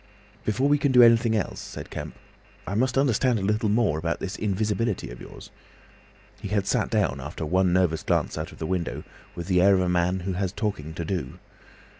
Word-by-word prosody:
"Before 130 +6 +1
we 145 0 +3
can 140 -1 +2
do 125 -1 +7
anything 115 -1 +5
else," 105 - -2
said - - -8
Kemp, - - -6 0.5
"I 100 - -4
must 130 +5 +1
understand 130 -2 +2
a 100 - -3
little 105 +2 +1
more 105 -8 +2
about 85 +1 -2
this 95 +1 -4
invisibility 105 - -1
of - - -10
yours." - - -11 0.9
He 105 - -4
had 100 -1 0
sat - - 0
down, - - 0
after - - -5
one 90 +3 +2
nervous 85 -3 +2
glance - - 0
out 80 +2 -5
of - - -14
the 80 - -4
window, 90 0 -2 0.3
with 85 - -5
the 90 -1 +2
air 100 +1 +6
of 95 - +2
a 90 - 0
man 90 +1 +1
who 95 +2 -3
has 95 0 -1
talking 100 -8 -3
to 85 - -4
do. 80 -7 -4
95 Hz, 210 wpm, -25 LUFS, 90-110 Hz, 0.9 s, do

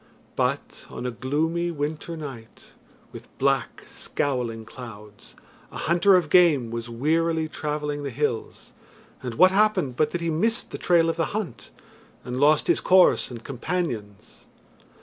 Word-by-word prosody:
But - - -2
on - - -7
a 125 - -1
gloomy 160 +8 -1
winter 155 +1 -4
night, 130 -7 -10 0.4
with - - -11
black, - - 0
scowling 120 -5 -3
clouds, 105 -4 -12 0.4
a - - -8
hunter 175 +4 +4
of 170 -4 +1
game 155 -10 +5
was 115 0 -5
wearily 160 +6 0
travelling 150 -1 -3
the 140 - -3
hills, 125 -3 -3 0.5
and 125 -3 -5
what 185 +9 +6
happened 190 - +2
but 155 -1 +2
that 175 - -4
he 170 -1 -1
missed 225 +9 0
the - - -6
trail 170 -2 +3
of 165 - -1
the 165 - +1
hunt, 170 - -6 0.5
and 125 +1 -4
lost 150 +2 +4
his - - +2
course 185 -1 +4
and 120 -2 -9
companions. 125 - -5
150 Hz, 150 wpm, -25 LUFS, 125-170 Hz, 0.5 s, what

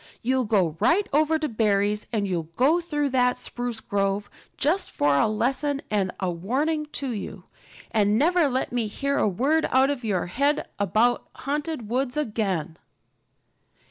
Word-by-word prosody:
You'll 255 +1 +1
go 190 -8 +1
right 390 +4 +3
over 310 +2 +3
to 310 -1 -2
Barry's, 210 -2 +1
and 210 -4 0
you'll 170 -4 -3
go 300 - +3
through 295 -4 -1
that 250 -1 +2
spruce 245 -2 -3
grove, 200 -1 -1 0.3
just 345 +7 +1
for 145 -1 +1
a 140 - +3
lesson 270 +6 0
and 195 -3 +1
a 190 -2 -1
warning 285 - -1
to 275 -3 -1
you. 200 -3 -6 0.5
And 210 -1 +2
never 330 +2 +3
let 260 0 -1
me 240 -3 -1
hear 280 +7 -1
a - - +3
word 275 - +1
out 265 +2 +4
of 265 -4 -4
your 200 -5 0
head 280 +11 0
about 215 +5 +1
haunted 290 -3 -3
woods 250 +3 -1
again." 195 - -2
245 Hz, 160 wpm, -25 LUFS, 205-285 Hz, 0.5 s, out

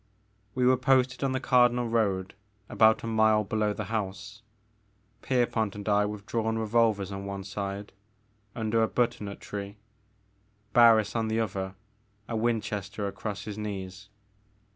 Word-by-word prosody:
We 125 -1 +2
were 130 0 +5
posted 130 0 +2
on 135 -1 +1
the 130 - 0
Cardinal 125 -2 +3
road 100 -5 0 0.4
about 110 0 +4
a - - -4
mile 110 -1 +3
below 105 +1 0
the - - -4
house, 105 0 -5 0.8
Pierpont 115 -5 0
and 105 0 -8
I 105 0 +3
with 105 -1 -7
drawn 115 -2 -1
revolvers 110 -3 +1
on 100 0 -5
one 100 -1 -5
side, 100 +1 -5 0.6
tmder 115 0 +1
a - - +2
butternut 115 -5 -1
tree, 100 0 -7 1.0
Barris 115 -3 +5
on 115 -1 0
the 110 +1 0
other, 95 -3 -3 0.5
a 115 - -3
Winchester 105 -3 -2
across 100 +1 -5
his 105 -1 -6
knees. 100 -1 -6
110 Hz, 140 wpm, -28 LUFS, 100-115 Hz, 1.0 s, were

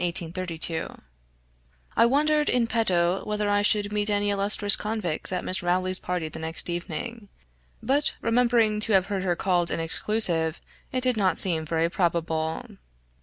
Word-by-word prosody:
} - - -2 1.9
I 230 - +5
wondered, 300 +3 +2
in 245 -2 +2
petto, 190 -6 0
whether 210 0 -2
I 205 0 +2
should 205 0 +1
meet 210 0 +1
any 205 0 0
illustrious 200 0 +4
convicts 210 -8 -3
at 180 - -3
Miss 185 - -1
Rowley's 185 +1 -1
party 180 -3 -3
the 155 - -8
next 160 +2 -1
evening; 200 +6 -6 0.5
but 285 +3 0
remembering 230 -2 +2
to 215 0 +2
have 190 -2 +4
heard 195 - -1
her 180 -2 0
called 175 -2 0
an - - -2
exclusive, 165 -1 0 0.3
it 255 - -1
did 250 -2 +1
not 190 -3 +1
seem 165 -4 +2
very 165 +1 0
probable. 165 -3 -2
195 Hz, 155 wpm, -25 LUFS, 175-220 Hz, 1.9 s, I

